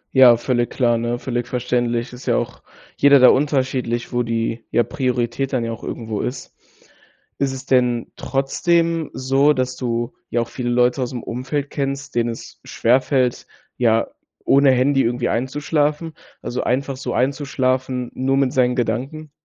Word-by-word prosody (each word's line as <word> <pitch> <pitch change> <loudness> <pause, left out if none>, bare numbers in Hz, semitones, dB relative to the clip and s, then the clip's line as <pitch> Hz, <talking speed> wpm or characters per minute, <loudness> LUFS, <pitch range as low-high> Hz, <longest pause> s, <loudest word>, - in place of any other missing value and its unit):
Ja, 125 -3 +8
völlig 120 0 0
klar, 120 -3 +1
ne, 120 +1 -1
völlig 120 -1 -3
verständlich. 120 -1 -1
Ist 125 - -11
ja - - +3
auch - - -4 0.4
jeder 140 0 +6
da 125 - +8
unterschiedlich, 130 -4 0
wo 120 - +1
die, 115 0 -2
ja, 120 - +2
Priorität 125 +1 -2
dann 120 -3 0
ja 115 - -3
auch 115 - -8
irgendwo 110 -3 -4
ist. 125 +1 -5 0.9
Ist 140 -1 +1
es 130 0 -7
denn 125 -3 +1
trotzdem 165 +4 0
so, 135 +3 +3
dass 130 -2 -2
du 120 -1 -2 0.2
ja 120 - 0
auch 115 - -4
viele 120 -2 -4
Leute 125 +2 +2
aus 125 - -1
dem 120 -2 -6
Umfeld 135 +4 -4
kennst, 140 0 -3
denen 120 0 +1
es 115 - -9
schwerfällt 125 +1 +1 0.3
ja, 115 -2 +2 0.4
ohne 140 -1 +5
Handy 135 +2 +3
irgendwie 120 +1 -1
einzuschlafen 150 +5 -1 0.3
also 120 +2 -3
einfach 135 +2 -1
so 130 -2 -4
einzuschlafen, 130 -2 -1
nur 135 +1 0
mit 135 -2 +1
seinen 125 -1 +2
Gedanken? 130 +6 -3
125 Hz, 160 wpm, -20 LUFS, 120-135 Hz, 0.9 s, Ja